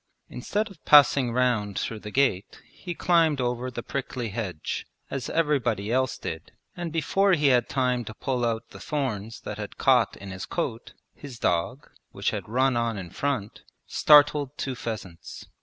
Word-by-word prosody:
Instead 205 - -2
of 175 - -17
passing 140 -4 +6
round 115 -5 +1
through 110 - -3
the 105 - -8
gate 115 -6 0
he 175 -2 -8
climbed 165 -5 +3
over 125 0 -1
the 120 -1 -6
prickly 130 -4 -4
hedge, 100 -7 -4 0.2
as 135 -2 -3
everybody 125 -10 0
else 130 0 +1
did, 80 0 -7 0.2
and 175 -2 -4
before 195 +5 +2
he 150 -4 +3
had 125 -2 +4
had - - -30
time 125 -2 0
to 110 -1 -9
pull 125 0 -2
out 115 0 -1
the - - -11
thorns 115 -6 -3
that 105 0 -6
had 105 - -7
caught 125 -5 +3
in 100 -1 -9
his 95 0 -6
coat, 125 -9 -4 0.2
his 135 -5 -10
dog, 105 - -1 0.2
which - - -2
had - - -5
run 130 +2 +2
on 115 -2 0
in 90 -4 -7
front, 130 -8 -3 0.2
started 145 -1 +5
two 135 - -3
pheasants. 95 -9 -7
125 Hz, 175 wpm, -26 LUFS, 110-140 Hz, 0.2 s, passing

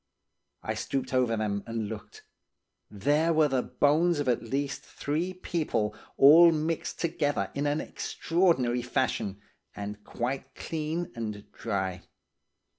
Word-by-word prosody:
I - - -1
stooped 130 -1 -3
over 125 -3 +2
them, 100 -2 -1
and 115 -2 -2
looked; 105 -1 -9 0.7
there 145 +10 +2
were 155 -1 +4
the 130 -3 +1
bones 160 +6 +2
of 145 -2 -1
at 120 -1 +2
least 140 +4 -2
three 160 +6 -2
people, 165 - -1 0.2
all 165 +5 +9
mixed 160 +1 -2
together 145 - 0
in 145 +1 -1
an 145 +1 +1
extraordinary 165 -9 +1
fashion, 105 -4 -1 0.4
and 105 0 -6
quite 130 +3 -4
clean 160 +2 -3
and 105 -3 -5
dry. 95 -2 -3
135 Hz, 125 wpm, -28 LUFS, 110-155 Hz, 0.7 s, all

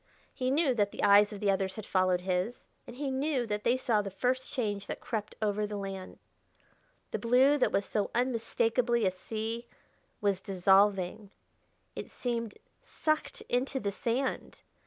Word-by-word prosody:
He 255 0 -1
knew 280 0 +3
that 205 -4 +1
the - - -6
eyes 205 +1 +6
of 205 - -7
the 200 -1 +3
others 190 -1 -1
had 215 - -7
followed 185 -1 +2
his, 185 +5 -2 0.2
and 240 - -9
he 275 +1 -3
knew 265 -1 0
that 210 -1 -3
they 245 +2 +3
saw 230 -4 +1
the 200 - -5
first 250 +6 -1
change 205 -7 -2
that - - -5
crept 215 -3 -4
over 210 0 0
the 205 0 -4
land. 195 -1 -6 0.9
The - - -2
blue 255 +5 +5
that - - +3
was 200 - +1
so 210 -2 -1
unmistakably 235 -1 +1
a 185 - +3
sea 225 +5 -5 0.5
was 200 -2 +1
dissolving; 195 +1 +2 0.7
it - - -6
seemed 235 -3 -3 0.3
sucked 310 0 -2
into 265 +2 -1
the 200 -4 -2
sand. 245 +6 -2
215 Hz, 165 wpm, -30 LUFS, 200-250 Hz, 0.9 s, eyes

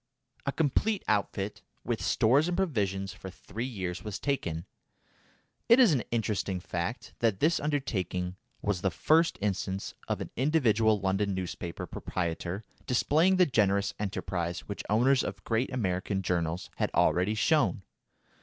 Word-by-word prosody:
A - - +2
complete 165 +8 +1
outfit, 100 -1 -1 0.2
with - - -2
stores 140 +8 +3
and 180 0 -1
provisions 100 - 0
for 95 +1 -9
three 110 +6 -6
years 95 -8 -4
was 105 -2 -4
taken. 85 - -2 1.0
It 235 +3 +8
is 235 -10 +7
an 130 - +2
interesting 105 -4 -1
fact 90 +6 -4
that 110 -5 +1
this 165 +3 +3
undertaking 95 - -2 0.3
was 100 -3 0
the 95 - +2
first 160 - +3
instance 95 -1 -2
of - - -1
an - - -6
individual 115 -7 +3
London 95 +1 0
newspaper 90 -2 -4
proprietor 85 +3 -3 0.2
displaying 155 +9 +3
the 185 -1 +5
generous 100 - +2
enterprise 90 -4 -2
which 100 - -6
owners 130 +5 +4
of 95 -1 -5
great 115 +3 0
American 95 -4 -1
journals 85 +1 -1
had - - +1
already 95 +5 +3
shown. 105 - +2
105 Hz, 140 wpm, -29 LUFS, 95-130 Hz, 1.0 s, It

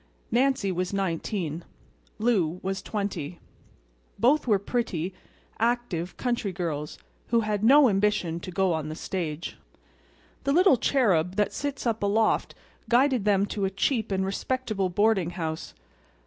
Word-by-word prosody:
Nancy 250 -4 +2
was 180 +1 -2
nineteen; 175 -3 -2 0.5
Lou 190 -7 +1
was 190 0 -2
twenty. 185 -7 -4 0.8
Both 270 +4 +3
were 210 -3 +4
pretty, 195 -5 -2 0.5
active, 230 -7 -1
country 240 -5 -1
girls 160 -5 -4 0.3
who 235 0 +3
had 210 -1 -1
no 275 +4 +7
ambition 195 -5 +1
to 180 - -8
go 185 0 +1
on 155 -1 -3
the 155 - -5
stage. 165 -3 -4 0.9
The 275 - +1
little 360 -3 +5
cherub 190 - +2
that 210 -1 +1
sits 285 -2 -4
up 225 -2 0
aloft 210 +2 +1 0.3
guided 250 -2 +3
them 200 -1 +3
to 205 -1 -2
a - - +1
cheap 220 +3 0
and 190 0 0
respectable 215 -1 -1
boarding 195 -1 +2
house. 160 -3 -4
200 Hz, 135 wpm, -27 LUFS, 180-235 Hz, 0.9 s, no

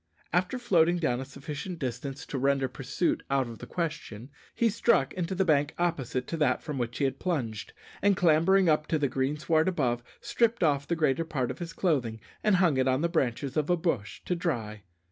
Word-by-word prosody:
After 185 +8 +1
floating 175 -8 +3
down 125 -8 0
a - - -5
sufficient 150 +6 -6
distance 135 0 -5
to 135 - -4
render 135 0 +2
pursuit 130 +7 -1
out 135 -2 +1
of 115 -1 -9
the - - -9
question, 145 -8 -4 0.2
he 235 - +3
struck 215 - +2
into 185 +1 -2
the 190 +1 +2
bank 145 -2 +2
opposite 135 -7 -1
to 165 - -2
that 140 -5 +1
from 150 -4 -4
which 120 0 -3
he 145 - -1
had 135 -1 0
plunged, 125 - -2 0.3
and 200 -1 +3
clambering 180 +3 +4
up 155 -1 +2
to 160 - +1
the 145 -2 +1
greensward 150 +5 +1
above, 125 -10 0 0.2
stripped 235 -3 +1
off 140 -3 +2
the 170 - 0
greater 160 -1 +1
part 140 -7 -2
of - - -9
his 170 -1 -5
clothing 125 -11 0 0.2
and 210 -2 +4
hung 175 -6 +3
it 130 0 +2
on 130 +2 +2
the 170 - +1
branches 135 -4 -1
of 155 0 0
a 175 - +3
bush 130 - -2
to - - 0
dry. 115 - -3
150 Hz, 205 wpm, -28 LUFS, 130-175 Hz, 0.3 s, clambering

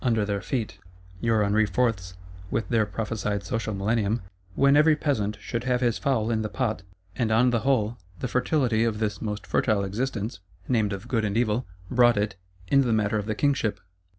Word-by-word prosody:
under 115 -4 +2
their 100 -1 -2
feet; 110 -7 -3 0.4
your 110 -1 +2
Henri 105 +2 +3
Fourths, 100 -7 -1 0.3
with 115 - -1
their 110 -3 +2
prophesied 105 -1 -3
social 115 -3 -2
millennium, 110 +2 0 0.4
"when 140 +1 +5
every 155 +1 +6
peasant 110 -9 -1
should 115 +2 -4
have 125 -1 +2
his 120 -2 +1
fowl 120 -6 +1
in 110 -1 +1
the 110 - -3
pot;" 110 -3 -1 0.3
and 115 -3 0
on 125 +3 +4
the 120 - +2
whole, 120 -3 +1 0.2
the - - -2
fertility 125 -2 +1
of 115 -2 0
this 105 -4 -2
most 105 -2 -4
fertile 105 -2 +1
Existence 105 0 -3 0.3
(named 110 -5 +1
of 100 +4 -5
Good 115 -3 0
and 105 0 -1
Evil),—brought 115 +1 +1
it, 105 -1 0 0.3
in 140 +7 +4
the 125 -3 +1
matter 105 -1 +1
of 105 - -5
the 110 - -1
Kingship. 135 -5 +1
110 Hz, 185 wpm, -26 LUFS, 105-125 Hz, 0.4 s, every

